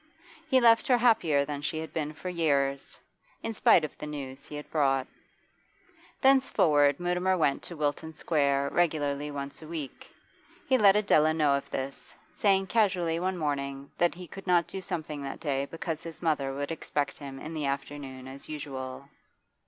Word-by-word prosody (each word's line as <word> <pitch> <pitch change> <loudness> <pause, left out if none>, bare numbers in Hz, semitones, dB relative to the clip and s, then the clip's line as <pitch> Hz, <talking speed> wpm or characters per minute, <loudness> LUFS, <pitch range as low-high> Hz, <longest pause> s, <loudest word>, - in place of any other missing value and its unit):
He 265 -4 +4
left 230 0 +5
her 250 -3 +5
happier 185 -12 +3
than 145 -1 -4
she 145 +2 -2
had 160 0 -6
been 155 -2 -2
for 155 +4 -9
years, 140 -6 0 0.4
in 225 - -2
spite 170 -6 +5
of 150 - -9
the 150 - -5
news 140 -2 -7
he 150 - -8
had 150 - -7
brought. 135 -4 +2 1.2
Thenceforward 155 - +4
Mutimer 180 +1 +1
went 145 -5 +1
to 170 - -8
Wilton 150 +2 -1
Square 140 -3 +1
regularly 150 -4 0
once 140 0 -6
a 155 - -10
week. 155 -4 -7 0.6
He 260 - +4
let 205 -5 +6
Adela 155 -7 +4
know 150 -3 +3
of 140 - -2
this, 135 +1 -6 0.2
saying 195 -2 +3
casually 185 -6 +1
one 185 +1 -1
morning 140 -3 -3
that 175 -1 +3
he 180 +1 -8
could 195 +3 -11
not 175 -2 +4
do 190 - -6
something 155 -4 -4
that 135 -1 -6
day 140 -3 -1
because 165 0 -4
his 165 -1 -9
mother 145 -4 +1
would 140 +3 -4
expect 145 -3 -2
him 135 -2 -8
in 155 +3 -7
the 155 -2 -2
afternoon 135 -1 -5
as 135 +1 -10
usual. 140 -3 -6
150 Hz, 175 wpm, -29 LUFS, 140-175 Hz, 1.2 s, let